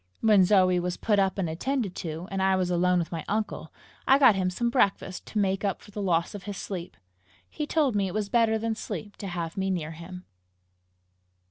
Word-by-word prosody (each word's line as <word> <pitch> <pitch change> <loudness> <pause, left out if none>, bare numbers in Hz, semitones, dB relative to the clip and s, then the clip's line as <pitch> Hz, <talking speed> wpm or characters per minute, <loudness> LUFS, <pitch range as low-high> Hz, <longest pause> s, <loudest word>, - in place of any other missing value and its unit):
When 210 -4 +6
Zoe 185 -2 +4
was 180 0 -2
put 210 -3 +1
up 195 0 +1
and 190 -3 0
attended 210 +5 -2
to, 165 +1 -5
and 195 0 -1
I 190 0 +3
was 185 -1 0
alone 180 +1 +3
with 170 -2 -2
my 165 -3 -4
uncle, 215 0 -3 0.4
I 270 - +7
got 265 -6 +7
him 185 -2 0
some 235 +6 -1
breakfast 195 -6 0
to - - -5
make 195 -1 +1
up 200 -2 -1
for 205 - -16
the 205 - -5
loss 170 -2 +1
of 200 -3 -8
his 205 -2 -5
sleep. 180 -2 -6 0.5
He 300 -1 -5
told 295 -8 +1
me 200 -1 +1
it 180 - -5
was 210 -1 -1
better 225 +1 +3
than 225 +1 -1
sleep 205 -2 -6
to 200 - -6
have 170 -2 -4
me 195 0 0
near 165 -4 -2
him. 180 +3 -10
195 Hz, 220 wpm, -27 LUFS, 180-215 Hz, 0.5 s, I